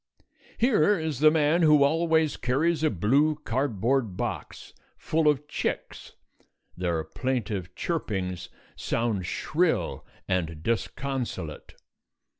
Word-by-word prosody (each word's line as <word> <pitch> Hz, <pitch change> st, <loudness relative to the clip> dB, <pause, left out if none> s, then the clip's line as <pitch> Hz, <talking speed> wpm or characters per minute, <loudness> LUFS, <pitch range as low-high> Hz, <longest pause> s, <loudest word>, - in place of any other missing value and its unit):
Here 210 Hz, -, +3 dB
is 160 Hz, -5 st, -3 dB
the 155 Hz, +1 st, +7 dB
man 155 Hz, +2 st, +2 dB
who 150 Hz, -3 st, +6 dB
always 160 Hz, 0 st, +2 dB
carries 155 Hz, +6 st, 0 dB
a 155 Hz, -, +4 dB
blue 135 Hz, -, +2 dB
cardboard 120 Hz, -4 st, 0 dB
box -, -, -5 dB, 0.2 s
full 160 Hz, 0 st, 0 dB
of 150 Hz, 0 st, +2 dB
chicks. -, -, -4 dB, 0.6 s
Their 85 Hz, -3 st, -1 dB
plaintive 105 Hz, -1 st, -3 dB
chirpings 95 Hz, -, -3 dB, 0.3 s
sound 110 Hz, -6 st, -1 dB
shrill 165 Hz, -, 0 dB, 0.2 s
and 80 Hz, -4 st, -2 dB
disconsolate. 115 Hz, -, -3 dB
135 Hz, 100 wpm, -27 LUFS, 100-155 Hz, 0.6 s, the